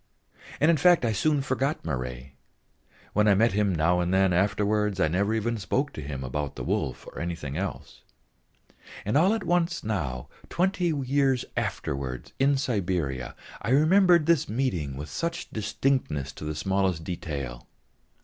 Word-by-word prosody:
And 155 +3 +5
in 165 - +3
fact 175 -1 +5
I 115 - +2
soon 140 +6 +1
forgot 135 +3 -1
Marey. 65 -3 -4 0.8
When 105 +1 +3
I 100 - +6
met 115 +4 +4
him 100 -2 +1
now 85 +3 +2
and 90 0 0
then 95 -1 +3
afterwards, 105 +2 +1
I - - +4
never 95 +6 +1
even 115 +1 -1
spoke 135 +8 -1
to - - -6
him 70 -2 -5
about 70 +2 -3
the - - -5
wolf - - -2
or - - -9
anything 85 -5 -4
else; 95 +3 -5 1.0
and 105 - 0
all 175 +7 +5
at 220 - -4
once 175 0 0
now, 75 - -3 0.2
twenty 180 0 0
years 135 -3 +1
afterwards 65 -2 -3
in 140 +1 +3
Siberia, 90 - -2 0.3
I - - -3
remembered 170 +4 +5
this 165 -8 +2
meeting 90 - -1
with 75 +2 -6
such 170 - -3
distinctness 105 - -1
to 75 - -9
the 75 0 -3
smallest 95 0 0
detail. 70 -8 -5
100 Hz, 160 wpm, -27 LUFS, -, 1.0 s, I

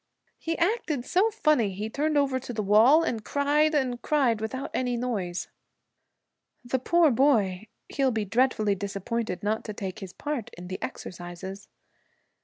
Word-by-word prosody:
'He 330 0 -2
acted 335 - 0
so 380 +9 +3
funny. 305 - +2
He 210 +3 -4
turned 295 +6 0
over 270 -2 +2
to 255 -1 -7
the 215 -3 -2
wall, 225 +11 +6
and 230 -9 -2
cried 295 +4 +2
and 255 -4 0
cried 255 -8 +2
without 260 +5 -4
any 250 -1 0
noise.' 195 -8 -3 1.2
'The 255 +2 0
poor 330 +3 +4
boy! 220 -7 +2 0.2
He'll 275 -2 +1
be 220 -4 -1
dreadfully 220 -1 +2
disappointed 200 +1 -3
not 215 +2 0
to 215 - -5
take 195 0 -5
his 190 -3 -8
part 290 -7 -4
in 180 +1 -9
the 185 - -5
exercises.' 180 +3 -7
240 Hz, 155 wpm, -27 LUFS, 205-285 Hz, 1.2 s, wall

